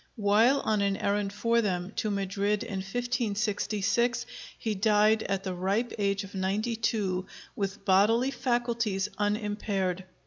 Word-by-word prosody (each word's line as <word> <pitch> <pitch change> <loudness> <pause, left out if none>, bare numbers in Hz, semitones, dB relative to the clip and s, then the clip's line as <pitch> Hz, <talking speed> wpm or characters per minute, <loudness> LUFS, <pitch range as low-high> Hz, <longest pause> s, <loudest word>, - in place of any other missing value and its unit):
While 220 +6 +4
on 215 -2 +1
an 200 -1 +1
errand 200 0 0
for 230 +3 +1
them 185 -3 -2
to 215 - 0
Madrid 200 +1 -1
in 210 -4 -5
1566, 220 +1 0 0.3
he 220 - -2
died 215 +1 +3
at 195 -2 -2
the 190 -1 -3
ripe 195 +7 -1
age 200 0 +1
of 195 - -11
ninety 200 +5 -1
two, 195 -5 -1 0.3
with 195 -1 -4
bodily 225 +7 +4
faculties 235 -6 0
unimpaired. 205 -3 -1
205 Hz, 135 wpm, -28 LUFS, 195-230 Hz, 0.3 s, While